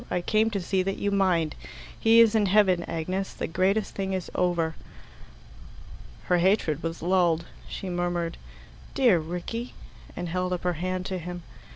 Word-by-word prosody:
I 180 Hz, -, 0 dB
came 215 Hz, +4 st, +2 dB
to 205 Hz, -3 st, -2 dB
see 190 Hz, +1 st, 0 dB
that 195 Hz, +1 st, -2 dB
you 205 Hz, -, -1 dB
mind. 180 Hz, -6 st, +2 dB, 0.5 s
He 225 Hz, +1 st, +6 dB
is 230 Hz, -1 st, +5 dB
in 215 Hz, -2 st, +3 dB
heaven, 190 Hz, -3 st, +4 dB
Agnes. 185 Hz, +4 st, -3 dB
The -, -, -3 dB
greatest 190 Hz, +5 st, 0 dB
thing 195 Hz, -1 st, -3 dB
is 185 Hz, -2 st, -4 dB
over." 170 Hz, -3 st, +1 dB, 1.5 s
Her 180 Hz, -1 st, +2 dB
hatred 170 Hz, -5 st, +2 dB
was 165 Hz, -1 st, -4 dB
lulled. 175 Hz, -2 st, +2 dB, 0.2 s
She 195 Hz, -, -6 dB
murmured, 175 Hz, -1 st, -2 dB, 0.6 s
"Dear 240 Hz, -10 st, +4 dB
Rickie!" 180 Hz, +9 st, -5 dB, 0.4 s
and 175 Hz, -, -4 dB
held 180 Hz, +2 st, -1 dB
up 180 Hz, -, -3 dB
her 180 Hz, 0 st, +1 dB
hand 185 Hz, +2 st, -3 dB
to 185 Hz, -1 st, -3 dB
him. 175 Hz, 0 st, -7 dB
180 Hz, 165 wpm, -26 LUFS, 170-195 Hz, 1.5 s, He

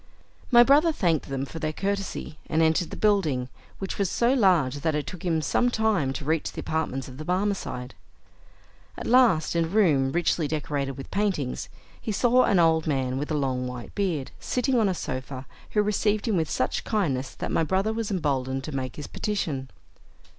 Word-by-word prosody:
My 240 Hz, -1 st, +8 dB
brother 295 Hz, +6 st, +5 dB
thanked 170 Hz, -, 0 dB
them 135 Hz, 0 st, -2 dB
for 165 Hz, -, -8 dB
their 155 Hz, -1 st, -1 dB
courtesy 195 Hz, -4 st, -3 dB
and 160 Hz, +1 st, +2 dB
entered 160 Hz, +1 st, +2 dB
the -, -, -7 dB
building, 160 Hz, -12 st, +1 dB, 0.3 s
which 195 Hz, +1 st, -5 dB
was 195 Hz, -3 st, +1 dB
so 240 Hz, +2 st, +2 dB
large 175 Hz, -, +3 dB
that 155 Hz, +1 st, 0 dB
it 150 Hz, -, -1 dB
took 180 Hz, -, -8 dB
him 165 Hz, -3 st, 0 dB
some 245 Hz, -, +2 dB
time 220 Hz, -, +1 dB
to 140 Hz, -, -6 dB
reach 160 Hz, +1 st, 0 dB
the -, -, -8 dB
apartments 135 Hz, -5 st, -2 dB
of 130 Hz, +1 st, -11 dB
the -, -, -4 dB
Barmecide. 180 Hz, -8 st, -2 dB, 1.0 s
At -, -, -6 dB
last, 230 Hz, -12 st, +4 dB
in 165 Hz, -1 st, +2 dB
a -, -, -4 dB
room 160 Hz, -9 st, +3 dB
richly 170 Hz, -1 st, +1 dB
decorated 145 Hz, -2 st, -2 dB
with 135 Hz, -, -9 dB
paintings, 190 Hz, -11 st, -1 dB, 0.3 s
he 220 Hz, -, -3 dB
saw 245 Hz, +4 st, +4 dB
an 195 Hz, -, +3 dB
old 160 Hz, -2 st, +3 dB
man 130 Hz, -3 st, 0 dB
with 145 Hz, -, -4 dB
a 155 Hz, -, 0 dB
long 130 Hz, -3 st, -1 dB
white 125 Hz, -1 st, -7 dB
beard, 175 Hz, -10 st, -1 dB
sitting 250 Hz, 0 st, 0 dB
on 210 Hz, -3 st, +3 dB
a 185 Hz, -, -1 dB
sofa, 130 Hz, -2 st, -5 dB, 0.3 s
who 210 Hz, -, +3 dB
received 210 Hz, +1 st, 0 dB
him 220 Hz, -, +2 dB
with 160 Hz, -3 st, 0 dB
such 130 Hz, -, -1 dB
kindness 140 Hz, -, -1 dB
that -, -, -4 dB
my -, -, +2 dB
brother 190 Hz, +6 st, 0 dB
was 225 Hz, -1 st, -3 dB
emboldened 135 Hz, -8 st, -1 dB
to 150 Hz, 0 st, -6 dB
make 130 Hz, -2 st, -3 dB
his 150 Hz, -, -6 dB
petition. 150 Hz, -11 st, -3 dB
160 Hz, 195 wpm, -26 LUFS, 135-205 Hz, 1.0 s, My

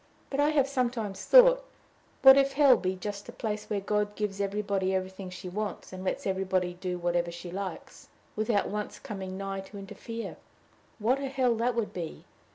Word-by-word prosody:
But 275 Hz, -, -2 dB
I 290 Hz, +1 st, +4 dB
have 285 Hz, -3 st, +3 dB
sometimes 240 Hz, -7 st, -2 dB
thought, -, -, +7 dB, 0.6 s
What 265 Hz, 0 st, +11 dB
if 275 Hz, 0 st, +3 dB
hell 275 Hz, -3 st, +7 dB
be 185 Hz, -4 st, -1 dB
just 200 Hz, +2 st, -6 dB
a -, -, -5 dB
place 210 Hz, -2 st, -4 dB
where 210 Hz, -, 0 dB
God 210 Hz, +1 st, -1 dB
gives 205 Hz, -2 st, -2 dB
everybody 200 Hz, -1 st, 0 dB
everything 190 Hz, 0 st, -4 dB
she 180 Hz, 0 st, -8 dB
wants, 200 Hz, +1 st, -4 dB
and 185 Hz, 0 st, -6 dB
lets 190 Hz, -, -2 dB
everybody 190 Hz, -2 st, 0 dB
do 180 Hz, 0 st, -4 dB
whatever 175 Hz, 0 st, 0 dB
she 170 Hz, +1 st, -8 dB
likes, 190 Hz, +1 st, -6 dB, 0.3 s
without 215 Hz, -1 st, +1 dB
once 210 Hz, 0 st, -4 dB
coming 190 Hz, -6 st, -6 dB
nigh 195 Hz, 0 st, -4 dB
to 195 Hz, +2 st, -9 dB
interfere! 225 Hz, +4 st, -7 dB, 0.6 s
What 240 Hz, +5 st, +1 dB
a 275 Hz, -, -2 dB
hell 260 Hz, -3 st, +2 dB
that 240 Hz, +1 st, +1 dB
would 230 Hz, -3 st, -1 dB
be! 170 Hz, -3 st, -6 dB
205 Hz, 180 wpm, -29 LUFS, 190-240 Hz, 0.6 s, What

